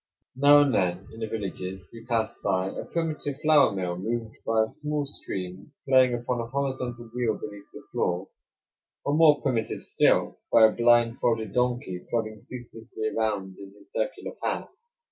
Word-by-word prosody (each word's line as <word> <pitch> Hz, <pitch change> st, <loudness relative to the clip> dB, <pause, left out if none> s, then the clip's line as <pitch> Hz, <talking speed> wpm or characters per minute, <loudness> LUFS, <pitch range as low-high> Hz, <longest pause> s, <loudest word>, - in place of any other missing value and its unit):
Now 145 Hz, +2 st, +7 dB
and 140 Hz, -3 st, +2 dB
then 90 Hz, -2 st, 0 dB
in 115 Hz, -, -10 dB
the 110 Hz, -, -2 dB
villages 95 Hz, -3 st, -5 dB
we 115 Hz, -1 st, -10 dB
passed 115 Hz, -3 st, -1 dB
by 95 Hz, -1 st, 0 dB
a -, -, -6 dB
primitive 155 Hz, -4 st, -2 dB
flour 150 Hz, -3 st, +6 dB
mill 90 Hz, -3 st, -2 dB
moved 115 Hz, +3 st, -3 dB
by 110 Hz, -1 st, +3 dB
a -, -, -2 dB
small 150 Hz, +2 st, -3 dB
stream 95 Hz, -3 st, -6 dB
playing 130 Hz, -2 st, +5 dB
upon 120 Hz, 0 st, -2 dB
a 115 Hz, -, -5 dB
horizontal 125 Hz, -3 st, -3 dB
wheel 120 Hz, -3 st, 0 dB
beneath 105 Hz, -1 st, -9 dB
the -, -, -11 dB
floor; 90 Hz, +2 st, -1 dB, 0.8 s
or, 140 Hz, -, +1 dB
more 150 Hz, -1 st, +6 dB
primitive 120 Hz, -5 st, -1 dB
still, -, -, +2 dB
by 115 Hz, -, +8 dB
a 110 Hz, -, +5 dB
blindfolded 120 Hz, -1 st, +2 dB
donkey 125 Hz, -7 st, -1 dB
plodding 110 Hz, -2 st, -2 dB
ceaselessly 115 Hz, -2 st, -6 dB
around 100 Hz, -4 st, -1 dB
in 100 Hz, 0 st, -11 dB
his -, -, -19 dB
circular -, -, -3 dB
path. -, -, -2 dB
115 Hz, 165 wpm, -27 LUFS, 105-130 Hz, 0.8 s, by